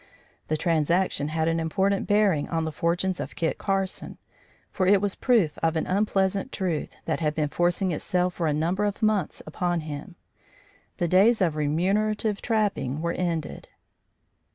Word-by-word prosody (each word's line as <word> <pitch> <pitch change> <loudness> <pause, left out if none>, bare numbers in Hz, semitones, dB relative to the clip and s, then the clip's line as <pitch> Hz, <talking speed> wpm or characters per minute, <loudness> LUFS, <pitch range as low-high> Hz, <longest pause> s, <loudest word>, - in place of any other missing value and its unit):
The 155 - 0
transaction 165 -1 +1
had 160 +1 -1
an 165 0 +1
important 190 +5 0
bearing 205 -8 +2
on 165 -1 -1
the 160 - -3
fortunes 175 +4 -1
of - - -6
Kit 165 - -1
Carson, 195 -1 -2 0.5
for 185 - 0
it 200 +1 +6
was 200 0 0
proof 220 - +2
of 165 0 +1
an 160 - 0
unpleasant 195 +2 0
truth 180 -6 -3
that - - -1
had 150 -2 -1
been 150 -2 0
forcing 175 +3 +1
itself 180 +3 0
for 170 -2 -1
a - - +2
number 170 +7 0
of 205 +2 -3
months 215 -6 0
upon 175 +2 -1
him: 155 +4 -7 0.8
the 175 - 0
days 200 +7 +4
of 170 -6 +1
remunerative 200 +8 0
trapping 200 - 0
were 170 +1 -1
ended. 170 -4 -3
175 Hz, 160 wpm, -26 LUFS, 160-195 Hz, 0.8 s, it